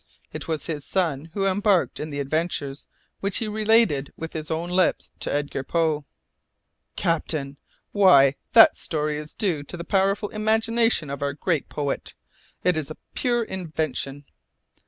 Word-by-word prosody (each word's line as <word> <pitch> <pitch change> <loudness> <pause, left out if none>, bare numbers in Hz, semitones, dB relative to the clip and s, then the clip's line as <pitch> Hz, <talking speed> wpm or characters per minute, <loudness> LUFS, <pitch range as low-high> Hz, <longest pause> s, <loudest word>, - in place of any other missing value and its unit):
It - - -6
was 160 -2 -2
his 150 -4 -4
son 165 -5 -1
who 195 -1 0
embarked 195 -1 +2
in 155 - -4
the 145 -1 -4
adventures 145 -1 -2 0.3
which 200 0 -1
he 225 - -1
related 215 -9 +2
with 165 0 -6
his 155 -1 -5
own 165 +2 -2
lips 185 0 +1
to - - -2
Edgar 145 -2 -2
Poe 155 -1 0 0.5
" - - -52
"Captain! 150 -4 -1 0.3
Why, 140 -10 +6 0.2
that 225 -1 +8
story 150 -1 -1
is 150 0 -8
due 175 -8 0
to 145 +4 -8
the 170 - -5
powerful 195 +2 +1
imagination 220 -5 +1
of 140 - -5
our 140 0 -1
great 160 -1 -1
poet. 145 -2 -3 0.5
It 180 - +3
is 155 -3 -2
a 155 - -8 0.2
pure 240 -2 +1
invention." 155 - -3
165 Hz, 155 wpm, -24 LUFS, 145-195 Hz, 0.5 s, that